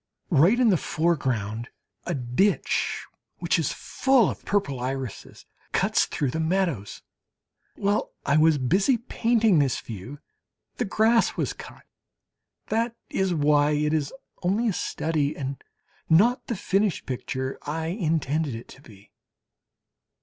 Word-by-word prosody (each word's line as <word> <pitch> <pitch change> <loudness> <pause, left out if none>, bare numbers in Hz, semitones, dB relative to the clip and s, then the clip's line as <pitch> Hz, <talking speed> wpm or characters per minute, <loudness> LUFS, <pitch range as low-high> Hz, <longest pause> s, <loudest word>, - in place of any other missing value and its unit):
Right 180 - +5
in 245 -3 +5
the 190 - +4
foreground 125 -10 -1 0.4
a 175 - -1
ditch 130 +11 0 0.3
which - - +1
is - - 0
full 265 -6 +2
of - - -10
purple 195 -11 0
irises 130 -2 -5 0.3
cuts - - +2
through 140 -4 -1
the 160 - -3
meadows. 160 - -1 0.7
While 205 +1 0 0.2
I 140 - +2
was 155 0 +5
busy 190 - +2
painting 230 -5 +2
this 135 -4 +1
view, 115 +6 -8 0.6
the 245 - 0
grass 220 +3 +2
was - - -1
cut, - - -12 0.8
that 230 +1 0 0.2
is 190 -1 0
why 145 0 +3
it 150 +1 +1
is 150 -3 0 0.3
only 200 +7 +1
a - - 0
study 155 -3 -1
and 135 -1 -5 0.5
not 225 +11 +4
the 235 - -2
finished 195 0 0
picture 130 0 -4
I 160 +2 -3
intended 160 - -1
it 115 - -9
to 135 - -14
be. 105 -6 -17
160 Hz, 135 wpm, -25 LUFS, 135-200 Hz, 0.8 s, Right